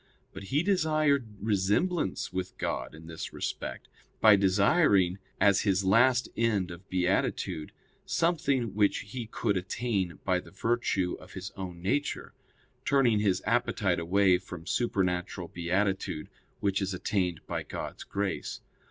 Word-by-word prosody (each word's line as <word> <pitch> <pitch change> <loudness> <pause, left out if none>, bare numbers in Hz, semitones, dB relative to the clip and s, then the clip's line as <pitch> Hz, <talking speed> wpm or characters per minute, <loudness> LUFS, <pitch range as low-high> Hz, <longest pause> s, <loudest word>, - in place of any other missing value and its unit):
But 95 +1 -8
he 145 - +1
desired 155 - +2
resemblance 105 - 0
with 95 0 -4
God - - -3
in 80 +1 -12
this 80 -1 -6
respect 60 - -5 0.3
by 110 -2 +8
desiring, 100 - +3 0.2
as 100 -2 +5
his 95 -2 +1
last 125 +5 +4
end 105 -6 +1
of 85 +3 -11
beatitude, 90 -3 0 0.3
something 140 - +1
which 100 0 +2
he 120 -3 -5
could 105 -2 0
attain 95 -1 -2
by 90 -1 +2
the - - -12
virtue 100 -4 0
of - - -14
his 95 +1 -6
own 90 -3 -7
nature, 145 +10 -1 0.5
turning 125 -6 +3
his 95 -3 +1
appetite 105 -5 +1
away 90 +2 +3
from 90 -3 -9
supernatural 90 -4 -1
beatitude, 90 -1 -1 0.3
which 100 0 +1
is 95 -1 -1
attained 90 -3 -1
by - - -3
God's - - -6
grace. 100 -1 -3
100 Hz, 135 wpm, -29 LUFS, 90-115 Hz, 0.5 s, by